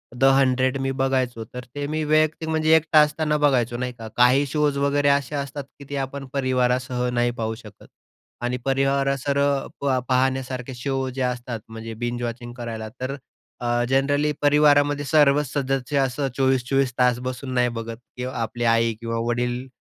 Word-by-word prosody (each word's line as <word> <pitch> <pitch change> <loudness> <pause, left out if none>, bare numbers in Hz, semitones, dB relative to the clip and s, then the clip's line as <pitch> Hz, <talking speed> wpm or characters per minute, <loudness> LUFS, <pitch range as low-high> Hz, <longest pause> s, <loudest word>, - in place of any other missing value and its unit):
'The 125 - -2
hundred' 130 0 +2
मी 135 0 -1
बघायचो, 130 -3 0
तर 125 0 -6
ते 145 0 -3
मी 155 +1 -2
वैयक्तिक, 155 +1 +1
म्हणजे 160 0 +4
एकटा 160 -1 +4
असताना 150 0 +1
बघायचो, 125 -5 +2
नाही 125 0 -3
का? 115 -2 -9
काही 125 +3 +5
शोज 150 0 0
वगैरे 140 0 +2
असे 140 0 +1
असतात 140 0 -4 0.2
की 140 - -10
ते 145 - -4
आपण 135 +1 -6
परिवारासह 125 -2 0
नाही 120 0 +2
पाहू 110 0 -2
शकत 110 -3 -14 0.5
आणि 125 +1 -1 0.7
परिवारासह 140 -1 +1 0.4
प 135 -2 +1
पाहण्यासारखे 130 0 0
शो 135 +1 -2
जे 135 - -3
असतात, 125 -2 -2
म्हणजे 115 0 -7
बिंज 120 0 -2
वॉचिंग 120 0 -5
करायला, 115 -2 -6
तर 130 +2 -2 0.5
अ, 120 0 +1
जनरली 145 +3 +2
परिवारामध्ये 145 0 +4
सर्वच 145 -1 +4
सदस्य 135 0 -1
असं 135 +1 0
24-24 135 0 +2
तास 125 -1 +4
बसून 130 +1 -5
नाही 125 -1 +2
बघत 115 0 -6 0.2
किंवा 125 +1 -4
आपली 115 +1 -3
आई 115 0 +3
किंवा 115 0 -3
वडील 125 +1 -1
130 Hz, 165 wpm, -23 LUFS, 120-145 Hz, 0.7 s, काही